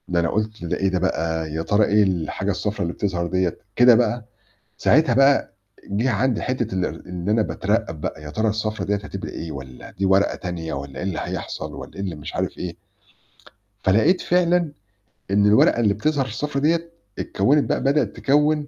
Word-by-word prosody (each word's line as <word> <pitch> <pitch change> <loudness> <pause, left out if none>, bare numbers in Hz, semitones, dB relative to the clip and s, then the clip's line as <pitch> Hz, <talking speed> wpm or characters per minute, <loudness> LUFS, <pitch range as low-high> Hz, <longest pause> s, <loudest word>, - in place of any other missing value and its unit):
ده 90 -1 +1
أنا 85 -1 +1
قُلت: 110 -3 -2
"ده 85 - -1
إيه 95 - +1
ده 95 -1 0
بقى، 80 -3 -1
يا 80 - -1
ترى 105 +4 +3
إيه 105 +1 +4
الحاجة 95 +1 -1
الصفرا 105 +2 -3
اللي 85 0 -2
بتظَهر 90 -4 -2
ديّة؟"، 90 -1 0 0.2
كده 125 -1 +7
بقى، 120 0 +1 0.5
ساعتها 155 +5 +4
بقى 135 -6 +4 0.3
جِه 115 +6 0
عندي 120 +2 +1
حتّة 125 -5 -2
إن 90 -1 +1
إن 90 +1 -5
أنا 110 +1 +3
باترَّقب 80 -6 -1
بقى، 80 - -4
"يا 75 - -7
ترى 110 +8 0
الصفرا 110 0 -2
ديّة 105 - +1
هتبقى 100 0 -6
إيه، 80 -1 -6
والّا 65 -3 -9
دي 95 - -2
ورقة 95 +1 +3
تانية 85 -3 -5
والّا 70 -1 -6
إيه - - -4
اللي 95 -2 -2
هيحصل، - - -5
والّا - - -9
إيه - - -5
اللي 95 -4 -3
مش 75 - -8
عارف - - -2
إيه." 85 -2 -5 1.1
فلقيت 110 - +3
فعلًا 175 -2 +2 0.6
إن 100 +1 +4
الورقة 105 +3 +5
اللي 105 -4 +3
بتظَهر 140 +5 0
الصفرا 140 +4 -3
ديّة، 165 +3 +1 0.3
اتكوّنت 140 +9 +2
بقى - - 0
بدأت 140 +2 +1
تكوِّن 150 +1 +2
105 Hz, 190 wpm, -22 LUFS, 90-130 Hz, 1.1 s, كده